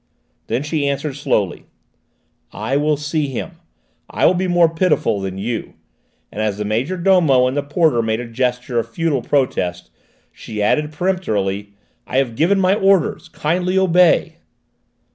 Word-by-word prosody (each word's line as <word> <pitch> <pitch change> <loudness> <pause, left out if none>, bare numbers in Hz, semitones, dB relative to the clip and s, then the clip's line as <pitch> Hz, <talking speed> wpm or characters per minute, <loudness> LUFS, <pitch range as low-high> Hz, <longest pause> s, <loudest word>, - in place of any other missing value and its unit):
Then 130 - -1
she 150 -1 -1
answered 140 +1 -2
slowly: 130 -10 -1 0.8
"I 135 - -3
will 150 +1 +1
see 150 +1 -2
him. 130 -3 -6 0.5
I - - 0
will - - +5
be 185 +1 -1
more 175 -1 +4
pitiful 165 - 0
than 95 -1 -5
you," 115 +4 -4 0.6
and 105 - -5
as 105 -2 -1
the 105 - -3
major 120 - -1
domo 170 -8 +4
and 130 +1 -1
the 145 - +1
porter 145 -3 +1
made 110 0 -1
a 120 - -6
gesture 125 0 -1
of 115 - -4
futile 155 0 -1
protest, 90 -10 -1 0.4
she 110 -2 -8
added 150 +9 +1
peremptorily: 105 - -2 0.3
"I 130 - -2
have 130 -4 0
given 180 - +2
my 185 0 +3
orders: 195 -3 +1
kindly 180 +4 -1
obey." 180 -2 +3
140 Hz, 155 wpm, -19 LUFS, 115-170 Hz, 0.8 s, will